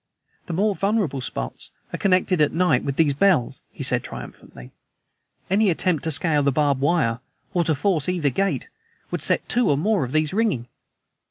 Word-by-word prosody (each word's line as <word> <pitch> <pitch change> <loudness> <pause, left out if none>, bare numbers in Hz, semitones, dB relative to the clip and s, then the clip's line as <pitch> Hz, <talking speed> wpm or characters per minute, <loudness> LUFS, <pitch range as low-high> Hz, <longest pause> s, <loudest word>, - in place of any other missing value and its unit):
"The 175 - -4
more 205 +5 +1
vulnerable 195 -9 -1
spots 60 - -5 0.2
are - - -2
connected 185 -2 +2
at 150 - +3
night 165 -7 +2
with 140 - -3
these 150 -2 +3
bells," 150 -5 +1
he - - -8
said - - +4
triumphantly. 60 0 -10 0.8
"Any 200 +2 +2
attempt 170 -2 0
to 160 - 0
scale 150 0 +2
the 140 0 +2
barbed 140 -1 +1
wire 140 -7 +1 0.3
or 175 -2 +2
to 160 - +1
force 165 0 0
either 165 -6 0
gate 195 +9 -1 0.4
would - - -3
set - - 0
two 245 0 +1
or 145 - +2
more 200 +2 +1
of 125 - -5
these 155 +1 0
ringing. 200 - 0
160 Hz, 180 wpm, -23 LUFS, 140-190 Hz, 0.8 s, said